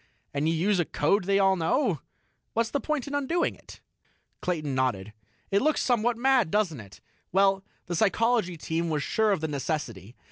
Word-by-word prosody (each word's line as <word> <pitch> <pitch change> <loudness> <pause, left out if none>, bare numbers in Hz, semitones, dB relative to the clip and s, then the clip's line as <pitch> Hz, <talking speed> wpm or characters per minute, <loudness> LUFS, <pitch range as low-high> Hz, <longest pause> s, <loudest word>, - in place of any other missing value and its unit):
And 145 +3 0
you 165 - +1
use 190 +4 +1
a 175 - +2
code 180 +8 +1
they 195 +1 +2
all 195 -1 +4
know. 180 - 0 0.5
What's 230 0 0
the 285 - 0
point 305 -3 -2
in 285 - -7
undoing 285 +5 0
it?" - - -15 0.6
Clayton 155 -6 -2
nodded. 110 -6 -1 0.4
"It 200 - +3
looks 310 +2 +2
somewhat 240 -1 +1
mad, 255 -5 +3
doesn't 180 -7 0
it? 100 -2 -13 0.3
Well... 195 +1 +3 0.2
the 175 - -4
Psychology 215 0 +1
Team 165 +2 -2
was 150 -2 -1
sure 220 -1 +1
of 190 -5 0
the 160 - -1
necessity. 130 - -4
190 Hz, 180 wpm, -27 LUFS, 155-230 Hz, 0.6 s, all